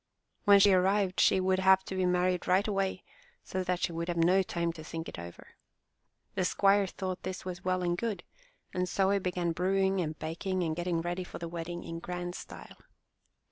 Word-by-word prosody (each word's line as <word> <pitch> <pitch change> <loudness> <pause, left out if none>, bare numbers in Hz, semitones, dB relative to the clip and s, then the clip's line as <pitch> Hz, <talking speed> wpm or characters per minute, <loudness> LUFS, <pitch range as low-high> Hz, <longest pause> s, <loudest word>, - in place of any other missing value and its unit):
When 200 -1 +8
she 195 0 +6
arrived 190 +1 +2
she - - +5
would 185 0 +2
have 190 0 +5
to - - -6
be 185 -1 +1
married 180 0 +1
right 190 +4 +3
away, 195 -2 -1 0.4
so 185 0 -3
that 180 -1 -1
she - - 0
would 170 0 -3
have 175 -1 -2
no 180 +3 +4
time 170 -2 -2
to 160 -2 -10
think 165 +1 -6
it - - -7
over. 85 0 -10 0.8
The 190 - 0
squire 195 +2 +3
thought 185 0 -5
this 185 0 -6
was 180 -1 -6
well 185 0 0
and 175 0 +1
good, 220 +1 -3 0.5
and 180 0 -1
so 195 +1 +2
he 200 - +2
began 180 -2 -1
brewing 190 +2 +1
and 155 -2 -3
baking 180 +4 -2
and 160 -2 -1
getting 175 -1 -1
ready 175 +2 -3
for - - -9
the 170 - -5
wedding 170 +1 -5
in 165 0 -6
grand 175 0 -5
style. - - -10
180 Hz, 205 wpm, -30 LUFS, 175-190 Hz, 0.8 s, When